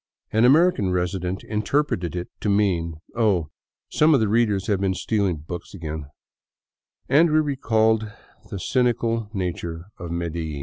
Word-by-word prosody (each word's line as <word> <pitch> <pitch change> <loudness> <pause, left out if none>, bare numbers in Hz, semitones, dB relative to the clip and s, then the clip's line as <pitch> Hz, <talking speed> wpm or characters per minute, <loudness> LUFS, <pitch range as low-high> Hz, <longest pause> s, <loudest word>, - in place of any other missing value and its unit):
'* - - -53
An 110 +2 +4
American 145 - +4
resident 90 +1 -2
interpreted 105 - -1
it 90 0 -3
to 105 - -1
mean, 90 -5 +1
" - - -29
Oh, 95 -9 +1 0.4
some 155 0 +4
of - - +3
the 110 - +2
readers 105 -3 +2
have 100 -2 0
been 95 -1 +1
stealing 100 -3 0
books 85 +2 -7
again 80 -4 -5 0.4
" - - -70
— - - -46
and 155 +6 +5
we 155 - +4
recalled 110 -7 +1 0.4
the 100 - -5
cynical 115 -1 0
native 85 -4 -4 0.2
of 85 -1 -6
Medellin. 85 -3 -3
100 Hz, 165 wpm, -23 LUFS, 85-115 Hz, 0.4 s, and